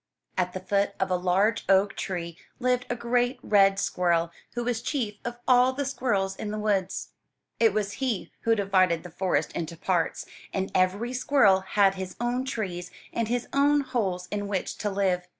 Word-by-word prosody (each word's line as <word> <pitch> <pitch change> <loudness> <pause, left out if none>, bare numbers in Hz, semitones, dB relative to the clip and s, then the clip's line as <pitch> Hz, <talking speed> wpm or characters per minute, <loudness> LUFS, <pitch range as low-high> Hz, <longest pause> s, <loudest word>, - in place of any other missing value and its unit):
At 180 -1 0
the 185 - -4
foot 200 +1 0
of 190 -1 0
a - - +3
large 185 +5 +2
oak 195 +1 +4
tree 170 -3 -4 0.2
lived 250 0 +1
a 245 - 0
great 245 +2 0
red 195 -1 +4
squirrel, 170 -3 +1 0.2
who 240 - -1
was 235 -2 -1
chief 230 -7 -2
of 240 0 -4
all 250 0 +5
the 285 +1 -2
squirrels 205 -8 0
in 210 - -5
the 215 - -3
woods. 200 -3 -1 0.5
It 225 -2 +5
was 205 0 -1
he 245 -8 -1
who 230 0 +3
divided 185 -5 +2
the 180 - -10
forest 185 +2 0
into 170 0 -5
parts, 175 -1 -1 0.3
and 190 0 -2
every 195 +7 +1
squirrel 250 -7 +4
had 195 0 +3
his 190 -1 -6
own 245 +2 -1
trees 185 -9 -4 0.2
and 230 -1 0
his 245 +1 -1
own 285 +1 +4
holes 190 -9 -2
in 205 -1 -2
which 195 -2 -3
to 210 - -1
live. 190 -3 0
200 Hz, 185 wpm, -27 LUFS, 185-240 Hz, 0.5 s, all